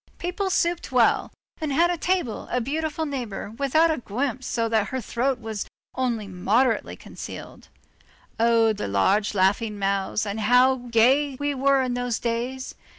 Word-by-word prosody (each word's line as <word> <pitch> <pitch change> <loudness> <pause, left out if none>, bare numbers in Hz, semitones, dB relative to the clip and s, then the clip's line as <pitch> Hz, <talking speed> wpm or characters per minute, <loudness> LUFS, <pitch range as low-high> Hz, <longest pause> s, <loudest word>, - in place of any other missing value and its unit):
People 360 +3 -2
supped 345 -4 0
well, 245 -3 +3 0.3
and 310 -3 -2
had 340 +5 +3
at 345 - -4
table 355 -11 -1
a 250 - 0
beautiful 310 +5 -2
neighbor 245 -8 -5
without 280 +7 +2
a 310 - -1
guimpe 255 +3 -3
so 230 -2 -1
that 220 -3 +1
her 260 - -3
throat 250 +2 -1
was 220 -3 -5 0.3
only 240 -5 -1
moderately 210 +7 +1
concealed. - - -10 0.7
Oh! 230 -1 +4
the 210 - -4
large 195 - +2
laughing 205 +3 +1
mouths, 195 +1 0
and 205 +1 -3
how 250 +4 +4
gay 260 +5 +3
we 290 0 0
were 275 0 +3
in 250 -1 -1
those 245 -2 -1
days! 245 +3 -3
245 Hz, 155 wpm, -24 LUFS, 220-275 Hz, 0.7 s, Oh